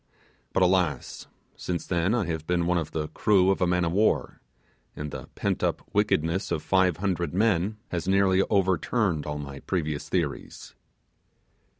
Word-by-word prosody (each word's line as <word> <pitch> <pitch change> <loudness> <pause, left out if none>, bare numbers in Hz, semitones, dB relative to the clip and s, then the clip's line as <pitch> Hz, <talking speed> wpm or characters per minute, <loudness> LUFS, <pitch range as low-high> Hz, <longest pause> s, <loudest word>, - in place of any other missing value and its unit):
But 95 - +2
alas! 90 -7 0 0.3
since 90 -1 -4
then 90 +5 +1
I 115 -6 0
have 80 -2 -4
been 85 -1 +1
one 90 0 +2
of 80 -2 -4
the 75 -1 -3
crew 95 -2 +3
of 95 - -1
a 90 - +3
man 90 0 +2
of 85 - -1
war, 105 +5 +1 0.5
and 75 -1 -5
the - - -7
pent - - -1
up - - -1
wickedness 95 -3 +1
of - - -2
five 95 -4 +2
hundred 90 -3 -2
men 105 0 +1
has 85 0 -3
nearly 95 -1 +4
overturned 95 -3 +1
all 75 0 -3
my 70 -1 -7
previous 75 -5 -3
theories. 80 -6 -3
90 Hz, 165 wpm, -26 LUFS, 80-95 Hz, 0.5 s, nearly